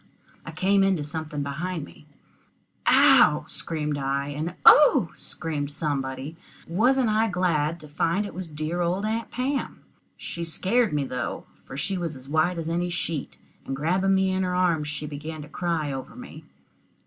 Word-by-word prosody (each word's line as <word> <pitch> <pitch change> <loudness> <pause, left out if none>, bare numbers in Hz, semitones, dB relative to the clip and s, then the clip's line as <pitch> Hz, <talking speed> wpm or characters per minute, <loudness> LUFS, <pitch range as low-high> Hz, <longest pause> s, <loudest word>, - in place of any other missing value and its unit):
I - - -5
came 195 +1 +2
into 190 -5 +2
something 150 -1 -4
behind 155 +3 -4
me. 150 - -17 0.8
"Ow!" - - +6
I - - -21
screamed, 150 -3 -2
and 140 +5 -2
"Oh!" 285 - +7
exclaimed 150 -3 -3
somebody, 140 -1 -3 0.3
and 170 - -8
wasn't 250 +3 +3
I 215 +1 +2
glad 170 -3 0
to 150 - -11
find 165 +7 0
it - - -7
was 180 -1 -6
dear 155 +3 -3
old 180 +4 0
Aunt 225 +1 -2
Pam. 265 +3 -3 0.3
She 170 - -6
scared 205 +7 +1
me, 145 -1 0
though, 125 -2 -4 0.2
for 130 - -8
she 185 +6 -1
was 165 -3 -3
as 130 0 -12
white 160 +4 +1
as 165 -1 -4
any 175 +2 -1
sheet, 165 -4 -3 0.3
and 135 - -4
grabbing 185 +7 +1
me 190 0 +2
in 190 0 0
her 180 -1 -1
arms, 170 -5 +1
she 150 0 -4
began 150 +1 -6
to - - -11
cry 160 -2 -2
over 135 -1 -6
me. - - -11
165 Hz, 170 wpm, -25 LUFS, 150-185 Hz, 0.8 s, Oh